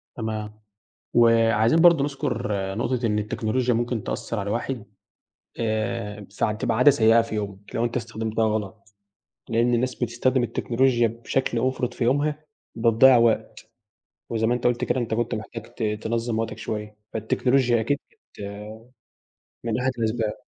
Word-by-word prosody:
تمام 110 -2 -5 0.6
وعايزين 115 +3 +4
برضه 170 -5 +6
نذكر 140 -5 -2 0.3
نقطة 120 +1 -1
إن 105 -1 +1
التكنولوجيا 115 +4 0
ممكن 120 -1 -1
تأثر 115 - -3
على 100 0 -3
الواحد 115 +1 -3 0.7
آآ 110 -2 -2
فتبقى 110 +1 0
عادة 135 +3 +7
سيئة 115 -3 +5
في 115 - -6
يومك 100 -1 -6
لو 115 - +1
أنت 120 +1 -2
استخدمتها 110 -1 -2
غلط، 105 -1 -4 0.6
لأن 120 +1 +2
الناس 125 +1 0
بتستخدم 125 +2 0
التكنولوجيا 120 0 +1
بشكل 120 +1 -2
مُفرط 130 -1 -1
في 120 - -2
يومها 150 +4 0 0.3
وبتضيّع 115 +3 +6
وقت 115 -1 +2 0.7
وزي 110 -1 0
ما 120 - +2
أنت 120 - -1
قُلت 120 0 +1
كده 130 - 0
أنت 115 -2 -2
كنت 120 +1 -1
محتاج 110 +1 -6
ت - - -6
تنظم 110 +2 -1
وقتك 115 - -3
شوية 105 -1 -5 0.2
فالتكنولوجيا 120 +2 +2
أكيد 140 +6 0
بت - - -20 1.2
من 115 0 -1
أحد 130 +1 +1
الأسباب. 110 -1 0
115 Hz, 145 wpm, -24 LUFS, 110-125 Hz, 1.2 s, عادة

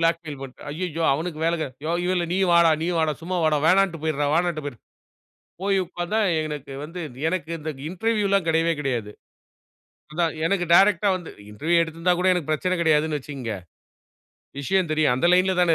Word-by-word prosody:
Blackmail 165 -3 -1
பண்ட்டேன். 135 0 -10
அய்யயோ! 165 0 -3
அவனுக்கு 160 +2 -3
வேலை 170 +1 +2
கெ - - -1 0.2
"யோ 165 - -1 0.2
இல்ல 175 -1 0
நீயும் 190 -1 +2
வாடா 170 -1 +6
நீயும் 170 0 0
வாடா, 155 -1 +1
சும்மா 180 +2 -3
வாடா. 155 -1 +3
வேணான்ட்டு 185 -2 +3
போயிருடா 150 -2 0
வேணான்ட்டு 170 -3 0
போயிரு". 140 -5 -6 0.8
போய் 195 0 +1
உட்கார்ந்தா 175 +5 -2 0.2
எனக்கு 145 -3 -6
வந்து 170 +4 -8 0.3
எனக்கு 165 -2 -2
இந்த 155 +1 -4 0.2
இன்டர்வியூலாம் 200 -1 0
கிடையவே 165 +1 +2
கிடையாது. 120 -7 -2 1.0
அதான், 165 +1 0
எனக்கு 180 0 +1
டைரக்ட்டா 195 +1 +5
வந்து 175 - -10 0.2
இன்டர்வியூ 165 +11 +1
எடுத்திருந்தா 165 +2 0
கூட 185 - +2
எனக்கு 165 -4 -3
பிரச்சனை 185 +4 0
கிடையாதுன்னு 155 -1 +2
வச்சிக்கங்க. 130 -5 -6 1.1
விஷயம் 185 +2 0
தெரியும். 155 -5 +2
அந்த 130 +7 +1
லைன்ல 185 +1 +3
தான 170 -2 +4
165 Hz, 165 wpm, -24 LUFS, 155-180 Hz, 1.1 s, வாடா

